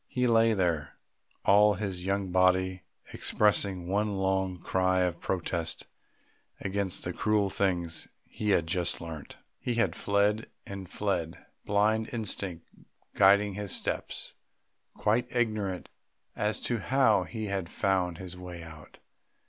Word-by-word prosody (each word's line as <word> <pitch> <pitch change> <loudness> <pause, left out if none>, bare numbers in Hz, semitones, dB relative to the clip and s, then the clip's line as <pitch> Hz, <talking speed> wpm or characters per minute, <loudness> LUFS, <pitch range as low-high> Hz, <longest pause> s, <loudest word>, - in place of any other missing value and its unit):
He 125 -1 0
lay 115 -1 +4
there, 85 -6 0 0.5
all 105 +1 +6
his 95 -2 -4
young 100 -1 0
body 95 0 +3 0.3
expressing 100 -3 +2
one 100 +2 0
long 95 -1 0
cry 95 +1 +1
of 90 -2 0
protest 85 -2 -2 0.7
against 100 -1 -2
the 90 - -3
cruel 105 -1 +1
things 90 -4 -1 0.2
he 105 - -4
had 85 -5 +3
just 85 +1 -1
learnt. 80 -3 -8 0.2
He 120 - -2
had 115 - +1
fled 105 +2 +1 0.2
and 95 -2 -7
fled, 90 -6 -2 0.2
blind 110 +2 +2
instinct 100 -7 -2 0.5
guiding 100 +1 +5
his 100 -1 +1
steps, - - -2 0.6
quite 110 +4 +1
ignorant 110 -6 -1 0.5
as 105 +1 0
to 120 -2 -1
how 110 -5 +3
he 110 +3 -5
had 95 -4 -2
found 95 -4 0
his 90 -1 -7
way 90 -2 -8
out. 80 -1 -12
95 Hz, 130 wpm, -29 LUFS, 90-105 Hz, 0.7 s, all